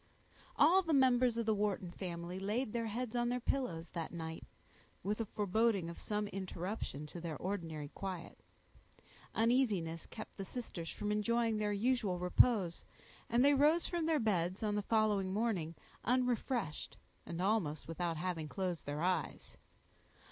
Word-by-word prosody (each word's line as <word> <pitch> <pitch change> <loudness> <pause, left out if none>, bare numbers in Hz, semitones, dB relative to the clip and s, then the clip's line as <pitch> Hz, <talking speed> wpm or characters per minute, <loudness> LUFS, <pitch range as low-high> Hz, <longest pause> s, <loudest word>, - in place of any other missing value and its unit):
All 350 +6 +6
the 330 -4 +1
members 255 -3 +4
of 230 - 0
the 220 - +3
Wharton 200 -4 -1
family 175 0 -5
laid 210 +4 -1
their 230 -1 -1
heads 240 +2 -3
on 240 0 +2
their 250 +1 0
pillows 180 -11 -2
that 165 -2 -4
night, 160 -1 -5 0.6
with 210 +4 -1
a - - -1
foreboding 205 -3 +1
of - - -10
some 210 0 -1
interruption 185 -5 -4
to 170 +3 -8
their 160 -3 -4
ordinary 165 -6 -3
quiet. 185 -2 -6 1.0
Uneasiness 215 -9 +2
kept 220 - -9
the 195 - -3
sisters 190 -7 -6
from 210 - -3
enjoying 225 +1 +2
their 210 -1 +1
usual 210 -3 +1
repose, 180 0 +3 0.5
and 240 +3 +4
they 285 - +7
rose 300 +5 +4
from 340 -2 -1
their 320 -1 +3
beds, 190 - 0
on 210 -1 +1
the 210 - +1
following 210 -3 +2
morning, 190 -6 0 0.3
unrefreshed, 245 - 0 0.3
and 170 - -4
almost 180 -7 0
without 165 0 -2
having 170 -2 -2
closed 180 -1 -3
their 145 +2 -2
eyes. 185 0 -1
205 Hz, 155 wpm, -35 LUFS, 175-235 Hz, 1.0 s, they